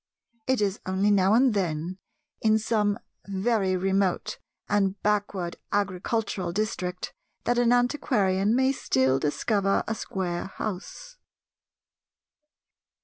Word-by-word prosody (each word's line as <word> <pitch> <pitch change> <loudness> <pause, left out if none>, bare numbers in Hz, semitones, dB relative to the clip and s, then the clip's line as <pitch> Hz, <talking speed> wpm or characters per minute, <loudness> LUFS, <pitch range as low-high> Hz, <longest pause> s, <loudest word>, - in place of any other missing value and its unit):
It 260 -3 +2
is 200 0 0
only 190 +2 +2
now 195 +1 +4
and 250 0 +4
then 175 -1 -2 0.4
in 220 0 +4
some 215 -2 +1 0.3
very 195 -1 +1
remote 190 0 0 0.3
and 200 -1 +1
backward 205 -4 0
agricultural 200 -1 -1
district 180 -3 -3 0.3
that 240 0 +1
an 240 -1 +4
antiquarian 230 -5 +2
may 260 +1 +3
still 130 - +1
discover 195 - +1
a 225 - 0
square 180 -5 -3
house. 225 - -6
200 Hz, 105 wpm, -26 LUFS, 185-220 Hz, 0.4 s, now